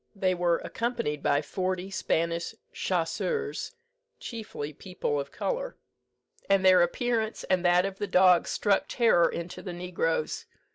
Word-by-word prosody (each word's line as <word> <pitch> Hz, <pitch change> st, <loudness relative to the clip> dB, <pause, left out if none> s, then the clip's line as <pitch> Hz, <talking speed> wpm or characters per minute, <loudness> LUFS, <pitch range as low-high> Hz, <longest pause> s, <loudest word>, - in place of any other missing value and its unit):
They 190 Hz, -2 st, +1 dB
were 175 Hz, -1 st, +2 dB
accompanied 235 Hz, -, -2 dB
by 145 Hz, +1 st, +2 dB
forty 185 Hz, +2 st, -3 dB
Spanish 170 Hz, -2 st, -1 dB, 0.2 s
chasseurs, 445 Hz, -1 st, -2 dB, 0.4 s
chiefly 210 Hz, -, -6 dB
people 145 Hz, -3 st, -3 dB
of 140 Hz, 0 st, -4 dB
colour, -, -, -3 dB, 0.7 s
and 195 Hz, -1 st, +4 dB
their 185 Hz, -1 st, +7 dB
appearance 220 Hz, +5 st, 0 dB
and 185 Hz, -1 st, +1 dB
that 175 Hz, +1 st, +5 dB
of 195 Hz, -1 st, -5 dB
the 205 Hz, -, -2 dB
dogs 180 Hz, -2 st, +5 dB
struck 205 Hz, -2 st, +2 dB
terror 225 Hz, -8 st, +4 dB
into 170 Hz, +1 st, -6 dB
the 180 Hz, -, -6 dB
negroes. 170 Hz, -3 st, -2 dB
185 Hz, 135 wpm, -28 LUFS, 170-210 Hz, 0.7 s, their